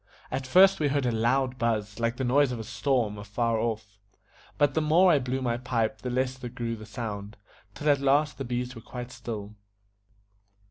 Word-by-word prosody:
At 130 0 -3
first 190 +6 +6
we 150 - +2
heard 140 -1 0
a 120 - +2
loud 125 +3 +1
buzz 110 -2 -1
like 115 +1 0
the 130 - -2
noise 135 +2 +3
of 125 - -3
a - - -4
storm 120 -3 -1
afar 110 +2 -1
off; 110 -3 -3 0.6
but 145 -2 +3
the 160 - +1
more 170 +4 +5
I 150 - +4
blew 130 +1 -2
my 120 -1 0
pipe 115 -3 -1
the 125 - -4
less 130 +1 -1
grew 120 -2 -4
the 110 -1 -11
sound, 105 -2 -6 0.4
till 150 - -4
at 145 -2 +5
last 145 +2 +2
the - - -2
bees 125 0 -3
were 115 - -10
quite 125 +2 -7
still. 110 -5 -6
125 Hz, 195 wpm, -27 LUFS, 115-135 Hz, 0.6 s, first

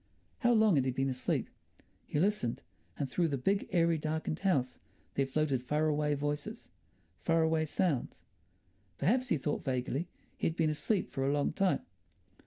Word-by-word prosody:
How 240 -2 +3
long 220 -7 +5
had 130 - +2
he - - +1
been 135 +1 0
asleep? 130 - -1 0.6
He 145 - -1
listened, 190 - 0 0.3
and 140 - -1
through 170 +6 +1
the 140 -3 -1
big, 195 +10 0
airy, 170 -2 +3
darkened 155 +1 -2
house 140 -10 +1 0.3
there 135 -1 +1
floated 140 -2 0
far 150 +5 0
away 150 0 +1
voices, 145 +1 -4 0.5
far 165 0 +2
away 160 0 +2
sounds. 155 -4 -1 0.7
Perhaps, 250 - +2
he 160 - +3
thought 145 +2 -2
vaguely, 130 +5 -1 0.3
he - - 0
had 165 - -2
been 160 -2 +2
asleep 190 +6 -1
for 135 - -2
a 135 - +2
long 145 0 +1
time. 195 +2 +2
155 Hz, 170 wpm, -32 LUFS, 135-170 Hz, 0.7 s, long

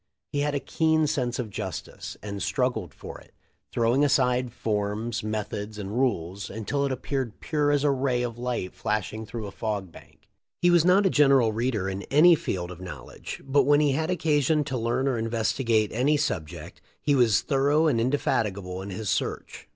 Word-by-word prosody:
He 145 - 0
had 145 0 0
a - - +1
keen 160 +1 +1
sense 130 -5 -1
of 115 -5 -4
justice, 90 -9 -6
and 100 -1 -5
strug 125 +4 0
gled 95 -9 -6
for - - -10
it, - - -22 0.4
throwing 120 +4 +2
aside 125 -3 +2
forms, 110 +1 -2
methods, 105 0 -4
and 100 -1 -5
rules, 100 -7 -1
until 110 +7 -2
it - - -3
appeared 130 -2 -3
pure 150 -2 0
as 145 -1 +2
a 145 - +4
ray 130 -2 0
of 120 -1 -4
light 120 -7 -3
flash 105 -1 -2
ing 110 0 -6
through 110 0 -5
a 100 - -6
fog 100 -3 -3
bank. - - -17 0.3
He 175 - +4
was 175 -2 +5
not 185 +3 +4
a 190 - +3
general 135 -6 +5
reader 110 -4 -1
in 95 0 -3
any 160 +5 +7
field 90 - -2
of 90 0 -10
knowledge, 90 - -8
but 135 0 +3
when 145 0 +5
he 150 -2 +3
had 155 +4 -1
occasion 155 -3 +2
to 135 - -4
learn 120 +3 0
or 125 -4 0
investigate 115 -1 +1
any 135 +6 +2
subject 90 - -4 0.2
he 145 - +1
was 120 -7 +4
thorough 145 +2 +2
and 130 -8 +2
indefatigable 100 -8 -1
in 100 - -7
his 100 +3 -5
search. - - -3
120 Hz, 190 wpm, -26 LUFS, 105-145 Hz, 0.4 s, any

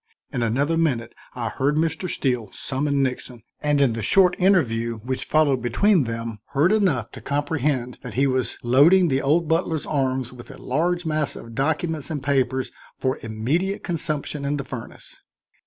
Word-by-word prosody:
In 125 - -1
another 140 +8 +1
minute 130 -9 0 0.2
I 120 -2 -2
heard 140 +2 0
Mr. 160 +3 0
Steele 125 -6 -1
summon 140 +1 -1
Nixon, 125 -2 -4 0.2
and 150 -1 +2
in 135 -4 +3
the 115 - -4
short 180 - +4
interview 120 - +2
which 130 +1 -3
followed 145 -5 +2
between 155 - +3
them 115 -1 -5
heard 150 +7 +3
enough 180 - +1
to - - -10
comprehend 145 -4 -1
that - - -8
he 135 +3 +3
was 130 -2 0
loading 160 +9 +5
the 135 0 +1
old 155 +4 +2
butler's 160 -1 0
arms 130 -3 -1
with 120 -1 -12
a - - -10
large 175 +6 -1
mass 155 -2 -1
of 115 0 -10
documents 155 +4 -1
and 145 -4 -4
papers 130 -2 0 0.3
for 130 0 -1
immediate 135 - -1
consumption 155 -4 -2
in 145 +1 -1
the 140 - -3
furnace. 120 -4 -9
140 Hz, 170 wpm, -23 LUFS, 125-160 Hz, 0.3 s, loading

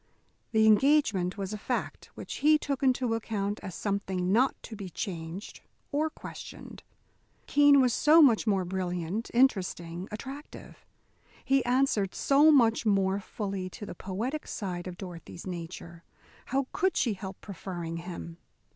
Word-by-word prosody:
The 220 -1 +4
engagement 220 -6 +3
was 195 0 -4
a 210 - -5
fact 245 +3 -3
which - - -6
he 305 +1 +5
took 280 -3 -3
into 255 -3 +2
account 210 -2 -2
as 185 - -7
something 190 -3 -1
not 250 +6 +3
to 225 - -8
be 200 -3 -7
changed 170 +2 -6 0.3
or 305 +2 +1
questioned. - - -10 0.6
Keene 285 -1 +6
was 250 -3 +3
so 305 +6 +6
much 240 -7 +5
more 195 -3 +2
brilliant, 180 +3 -3
interesting, 185 -7 +1
attractive. 270 +7 -9 0.6
He 270 -1 +3
answered 245 -6 +1
so 285 +3 +5
much 235 -6 +4
more 195 -2 +2
fully 195 -2 -4
to 205 - -8
the - - -7
poetic 220 - -4
side 180 -4 -4
of 180 -1 -7
Dorothy's 175 -2 -9
nature. 170 -1 -7 0.4
How 270 +1 0
could 375 0 +1
she 230 - +2
help 190 0 -8
preferring 175 -4 -6
him? 170 -1 -7
205 Hz, 145 wpm, -29 LUFS, 185-260 Hz, 0.6 s, Keene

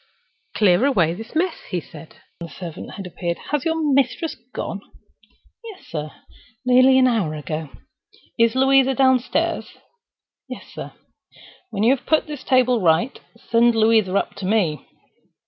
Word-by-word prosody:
"Clear 200 0 +3
away 180 - +2
this 225 - -10
mess," 345 +2 -1
he 180 - -1
said, 160 -1 -13 0.2
when 170 - -6
the - - -16
servant 180 +4 -8
appeared. 175 -1 -4
"Has 295 -3 -1
your 325 0 0
mistress 275 +4 +1 0.2
gone?" 200 - -5 0.8
"Yes, 435 -5 -11
sir—nearly 250 - 0
an 260 - +5
hour 215 -11 0
ago." 155 0 -5 0.7
"Is 230 0 +2
Louisa 270 0 +4
downstairs?" 260 -1 +1 0.7
"Yes, - - -8
sir." - - -8 0.8
"When 200 - -2
you 250 +4 +5
have 265 - -16
put 315 - +2
the 300 - -6
table 255 -3 +2
right, 170 +8 +1 0.2
send 235 0 +2
Louisa 220 -3 +3
up - - -2
to 195 -2 -4
me." 185 -8 0
230 Hz, 140 wpm, -21 LUFS, 180-260 Hz, 0.8 s, an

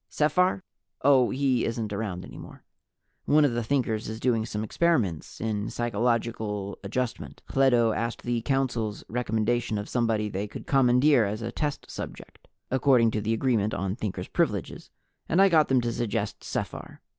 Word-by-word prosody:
Sephar? 180 +5 +2 0.4
Oh, 130 -3 +5
he 130 -2 +1
isn't 115 -2 -2
around 100 -4 -4
any - - -11
more. - - -12 0.6
One 150 +1 +5
of 135 - +1
the 120 0 -1
Thinkers 115 -4 -1
is 110 0 -5
doing 115 -2 +1
some 105 -1 -3
experiments 110 - 0
in 105 -2 -2
Psychological 115 -3 -1
Adjustment. 120 +4 -4
Hledo 120 -4 +3
asked 115 +1 -3
the 120 -1 -1
Council's 120 -5 -1
recommendation 115 -1 0
of 105 +1 -4
somebody 115 -3 0
they 100 0 -3
could - - -9
commandeer 130 -1 +4
as 105 +3 -3
a 115 - -3
test 145 +2 -3
subject, - - -9 0.2
according 130 -3 +4
to 110 - -1
the 110 +2 0
Agreement 110 -4 +1
on 95 0 -2
Thinkers' 105 -6 -4
Privileges, - - -2 0.4
and 170 - +2
I 195 0 +7
got 160 -4 +4
them 130 -2 +3
to 120 0 -1
suggest 115 -3 -3
Sephar. - - -5
115 Hz, 160 wpm, -27 LUFS, 110-130 Hz, 0.6 s, I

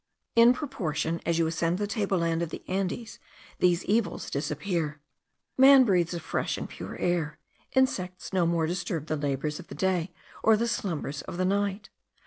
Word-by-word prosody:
In 235 +1 +7
proportion 170 - -2
as 170 -1 +2
you 165 - +3
ascend 165 +2 0
the 205 - -1
table 200 -2 0
land 165 -1 0
of 170 - -2
the - - -7
Andes 195 +4 -3 0.4
these 175 -1 +3
evils 215 +1 0
disappear. 155 0 -2 0.6
Man 270 0 +9
breathes 180 -6 +2
a - - -3
fresh 160 - -2
and - - -4
pure - - -8
air. 165 -4 -1 0.4
Insects 185 -9 0
no 180 -3 +3
more 165 -1 +1
disturb 170 -2 -2
the 155 - -1
labours 145 +1 -2
of - - -11
the - - -9
day 185 -2 0 0.3
or 220 -1 +5
the 235 +2 0
slumbers 165 -10 -2
of 170 - -7
the 185 - +1
night. 200 +1 -1
180 Hz, 175 wpm, -28 LUFS, 165-205 Hz, 0.6 s, Man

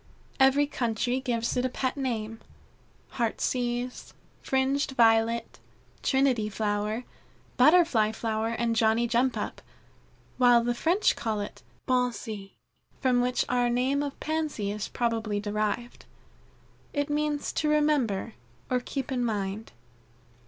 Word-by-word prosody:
Every 270 +2 +5
country 245 -2 -1
gives 235 -3 -1
it 250 - +1
a 255 - +1
pet 255 +1 -2
name 225 -5 -3 0.8
Heartsease, 245 +1 -2 0.3
Fringed 270 +1 0
Violet, 230 -1 +2 0.4
Trinity 265 -6 +2
Flower, 210 +2 -1 0.5
Butterfly 255 -7 +5
flower, 220 0 -2
and 230 0 -1
Johnny 225 +1 +3
jump 245 +2 +1
up, - - -4 0.8
while 245 -2 +6
the 240 +1 +1
French 340 - +2
call 220 -2 -2
it 205 - -6 0.3
Pensée, 235 -5 -1 0.5
from 250 -2 +2
which 250 0 +1
our 245 -1 +1
name 255 +4 +1
of 285 -1 -5
Pansy 305 -10 -2
is 210 0 -4
probably 225 -3 -1
derived. 215 +3 -3 0.9
It 285 0 -1
means 295 -1 -1
to 305 - 0
remember 285 -9 +1 0.4
or 250 - +3
keep 270 +2 -5
in 250 -2 0
mind. 210 -1 -3
240 Hz, 120 wpm, -28 LUFS, 220-265 Hz, 0.9 s, while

